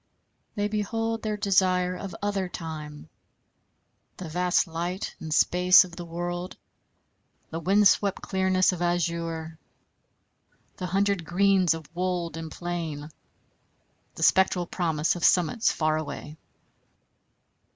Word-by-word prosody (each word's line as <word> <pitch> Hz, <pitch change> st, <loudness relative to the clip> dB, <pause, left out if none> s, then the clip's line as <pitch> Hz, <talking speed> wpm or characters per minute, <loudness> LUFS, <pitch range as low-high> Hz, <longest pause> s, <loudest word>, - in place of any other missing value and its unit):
They 205 Hz, -1 st, 0 dB
behold 225 Hz, +2 st, -2 dB
their 215 Hz, -1 st, -2 dB
desire 185 Hz, -2 st, +2 dB
of 185 Hz, -2 st, -7 dB
other 200 Hz, -3 st, -1 dB
time, 155 Hz, -3 st, -7 dB, 1.1 s
the 180 Hz, -, -7 dB
vast 180 Hz, +2 st, +1 dB
light 175 Hz, +3 st, -4 dB
and 160 Hz, -1 st, -7 dB
space 180 Hz, +4 st, +6 dB
of 180 Hz, -2 st, -11 dB
the 175 Hz, -, -7 dB
world, 175 Hz, +2 st, -5 dB, 0.9 s
the 165 Hz, -, -3 dB
wind 195 Hz, +4 st, +4 dB
swept 200 Hz, 0 st, +2 dB
clearness 190 Hz, -1 st, +2 dB
of 180 Hz, -2 st, -5 dB
azure, 170 Hz, -2 st, -2 dB, 1.2 s
the 180 Hz, -, -4 dB
hundred 195 Hz, 0 st, +1 dB
greens 185 Hz, 0 st, +3 dB
of 160 Hz, -1 st, -9 dB
wold 180 Hz, -2 st, -2 dB
and 165 Hz, -1 st, -6 dB
plain, 165 Hz, -4 st, -5 dB, 1.0 s
the -, -, -4 dB
spectral 190 Hz, -1 st, +3 dB
promise 165 Hz, -3 st, 0 dB
of 175 Hz, -, -6 dB
summits 180 Hz, +5 st, +3 dB
far 155 Hz, -1 st, 0 dB
away. 150 Hz, -1 st, -6 dB
180 Hz, 120 wpm, -26 LUFS, 165-190 Hz, 1.2 s, space